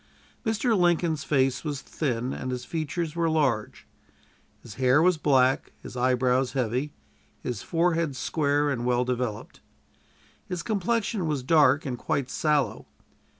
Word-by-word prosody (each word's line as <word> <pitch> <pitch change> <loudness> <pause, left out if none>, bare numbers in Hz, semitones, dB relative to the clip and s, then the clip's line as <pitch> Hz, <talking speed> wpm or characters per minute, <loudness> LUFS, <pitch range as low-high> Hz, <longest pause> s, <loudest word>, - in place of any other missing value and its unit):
Mr. 225 0 +1
Lincoln's 170 -4 +2
face 135 -4 +1
was 145 -4 -4
thin, 125 -4 -2
and 130 - -5
his 125 -1 -4
features 160 0 -3
were 170 -1 +1
large. 140 -9 0 0.8
His - - -10
hair 130 +3 +5
was 175 0 +3
black, 135 -3 +2
his - - -9
eyebrows 125 +1 +1
heavy, 130 +2 -1 0.5
his 120 -5 -3
forehead 165 -3 0
square 145 +1 0
and 120 -3 -2
well 125 0 +1
developed. 125 -4 -3 0.9
His 180 -2 -4
complexion 210 -2 -1
was 145 -4 -1
dark 145 0 +4
and 125 -3 -4
quite 130 -2 -2
sallow. 150 -3 0
145 Hz, 135 wpm, -26 LUFS, 125-165 Hz, 0.9 s, hair